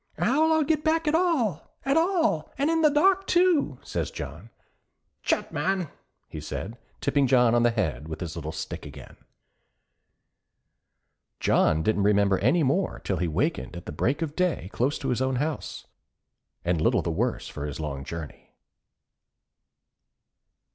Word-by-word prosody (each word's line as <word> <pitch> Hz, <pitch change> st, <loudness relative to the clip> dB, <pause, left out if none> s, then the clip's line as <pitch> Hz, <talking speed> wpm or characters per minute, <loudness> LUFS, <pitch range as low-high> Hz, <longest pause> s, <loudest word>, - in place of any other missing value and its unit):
'How'll 310 Hz, +6 st, +3 dB
I 315 Hz, -1 st, +3 dB
get 305 Hz, 0 st, 0 dB
back 320 Hz, 0 st, +1 dB
at 300 Hz, -, +2 dB
all, 305 Hz, -, 0 dB
at 275 Hz, +1 st, +2 dB
all, 325 Hz, -, +2 dB
an' 285 Hz, +4 st, +1 dB
in 325 Hz, 0 st, +2 dB
the 305 Hz, -, +6 dB
dark, 380 Hz, +6 st, +3 dB
too?' 345 Hz, -, +3 dB
says -, -, -3 dB
John. 75 Hz, -, -8 dB, 0.7 s
'Tchut, -, -, 0 dB
man,' 185 Hz, -4 st, -1 dB, 0.4 s
he -, -, -7 dB
said, 115 Hz, +4 st, -6 dB, 0.2 s
tipping 140 Hz, -2 st, +2 dB
John 125 Hz, -3 st, +4 dB
on 120 Hz, -, +4 dB
the 120 Hz, -, +4 dB
head 90 Hz, -, -2 dB
with 80 Hz, -, -6 dB
his 85 Hz, -4 st, -5 dB
little -, -, -5 dB
stick -, -, -6 dB
again. -, -, -11 dB, 2.2 s
John 80 Hz, 0 st, +3 dB
didn't 105 Hz, +2 st, +1 dB
remember 100 Hz, -1 st, +3 dB
any 145 Hz, -, +3 dB
more 170 Hz, +8 st, +1 dB
till 95 Hz, -, -1 dB
he 90 Hz, +1 st, 0 dB
wakened 105 Hz, -, -1 dB
at 85 Hz, -, -8 dB
the -, -, -6 dB
break 130 Hz, -, 0 dB
of 150 Hz, -2 st, -5 dB
day 180 Hz, -, -1 dB
close 135 Hz, +5 st, 0 dB
to 135 Hz, -, -4 dB
his 125 Hz, 0 st, 0 dB
own 130 Hz, 0 st, +1 dB
house, 145 Hz, +3 st, -3 dB, 0.8 s
and 85 Hz, -2 st, +1 dB
little -, -, +2 dB
the 85 Hz, -, -1 dB
worse 115 Hz, +9 st, -1 dB
for 75 Hz, 0 st, -5 dB
his 75 Hz, -, -6 dB
long 70 Hz, -3 st, -4 dB
journey. 80 Hz, 0 st, -8 dB
135 Hz, 160 wpm, -26 LUFS, -, 2.2 s, the